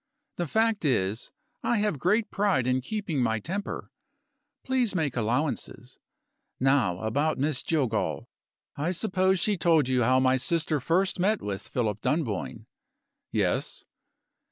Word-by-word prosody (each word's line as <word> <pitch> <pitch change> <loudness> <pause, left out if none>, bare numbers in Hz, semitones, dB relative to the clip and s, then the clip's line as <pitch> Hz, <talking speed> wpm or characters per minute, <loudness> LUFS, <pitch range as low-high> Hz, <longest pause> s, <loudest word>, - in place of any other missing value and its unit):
The 175 - -1
fact 220 +3 +1
is, 110 -6 0 0.3
I 240 - +1
have 205 -8 0
great 210 - +1
pride 200 -11 +1
in 130 +1 +1
keeping 180 - -2
my 110 -2 +1
temper. 190 - -5 0.7
Please 255 -6 0
make 155 -7 0
allowances. 125 +1 -2 0.6
Now 130 -9 +2
about 145 +8 0
Miss 145 0 0
Jillgall. 130 -9 -1 0.5
I 160 +6 -1
suppose 190 0 +1
she 205 +3 +1
told 160 -5 +3
you 130 -1 +2
how 130 +2 +4
my 130 0 +3
sister 160 +3 0
first 180 +8 +1
met 205 +4 +2
with 100 -2 -5
Philip 105 -4 -2
Dunboyne?" 115 - -2 0.7
"Yes." - - -1
150 Hz, 130 wpm, -27 LUFS, 125-185 Hz, 0.7 s, how